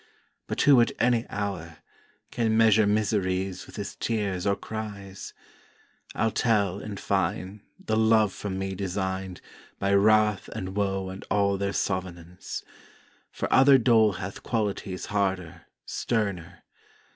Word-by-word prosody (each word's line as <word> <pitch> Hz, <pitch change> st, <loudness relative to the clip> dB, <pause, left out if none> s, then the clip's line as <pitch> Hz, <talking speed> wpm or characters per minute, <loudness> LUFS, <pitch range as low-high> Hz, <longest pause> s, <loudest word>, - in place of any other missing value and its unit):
But -, -, -1 dB
who 140 Hz, -4 st, +7 dB
at 115 Hz, -, +2 dB
any 120 Hz, -1 st, +2 dB
hour, 90 Hz, -6 st, -4 dB, 0.5 s
Can 110 Hz, -2 st, +1 dB
measure 110 Hz, -2 st, +5 dB
miseries 100 Hz, 0 st, 0 dB
with 130 Hz, -, -13 dB
his 100 Hz, -2 st, -5 dB
tears 100 Hz, -5 st, -2 dB
or 100 Hz, -, +3 dB
cries? 100 Hz, -3 st, -7 dB, 0.8 s
I'll 110 Hz, 0 st, +1 dB
tell, 100 Hz, -6 st, +1 dB
in 105 Hz, -1 st, -7 dB
fine, 95 Hz, +1 st, -2 dB, 0.2 s
the 110 Hz, -, -2 dB
love 110 Hz, -2 st, +4 dB
for 105 Hz, -, -6 dB
me 95 Hz, 0 st, -3 dB
design'd 95 Hz, -1 st, -3 dB, 0.4 s
By 100 Hz, 0 st, 0 dB
wrath 105 Hz, 0 st, +4 dB
and 95 Hz, +1 st, -5 dB
woe 95 Hz, -2 st, -1 dB
and 95 Hz, +1 st, -8 dB
all 100 Hz, -1 st, +2 dB
their 100 Hz, 0 st, -1 dB
sovenance; 90 Hz, -3 st, -4 dB, 0.7 s
For -, -, -3 dB
other 135 Hz, +1 st, +7 dB
dole 115 Hz, -4 st, +4 dB
hath 95 Hz, +1 st, -6 dB
qualities 100 Hz, -4 st, -2 dB
harder, 95 Hz, -5 st, -2 dB, 0.2 s
sterner. 90 Hz, -7 st, -3 dB
100 Hz, 130 wpm, -26 LUFS, 95-110 Hz, 0.8 s, who